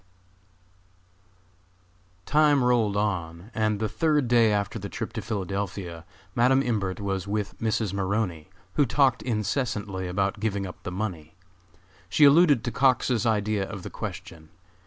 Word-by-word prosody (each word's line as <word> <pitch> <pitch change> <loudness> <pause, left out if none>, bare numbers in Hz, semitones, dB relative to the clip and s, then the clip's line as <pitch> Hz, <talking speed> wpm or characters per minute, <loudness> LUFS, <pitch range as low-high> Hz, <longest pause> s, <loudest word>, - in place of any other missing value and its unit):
_ - - -37
Time 150 -2 +4
rolled 115 -5 +2
on, 90 -1 -3
and 110 -1 0
the 110 - 0
third 150 +2 +1
day 115 -2 +4
after 100 -1 -1
the - - -6
trip - - -5
to - - -4
Philadelphia, 95 -4 -4 0.3
Madam 130 +3 +3
Imbert 100 -7 -1
was 95 -1 -3
with 105 0 -2
Mrs. 110 -3 -1
Maroney, 95 -4 -2 0.2
who 145 - +3
talked 130 -1 +3
incessantly 105 -4 -2
about 95 +3 -1
giving 100 -2 -1
up 90 - -9
the 90 - -6
money. 90 -5 -5 0.7
She 145 +11 +5
alluded 145 -4 +6
to 120 - -2
Cox's 125 -3 +2
idea 105 -2 +1
of 100 -4 -7
the - - -7
question. 80 -1 -8
105 Hz, 140 wpm, -26 LUFS, 95-120 Hz, 0.7 s, alluded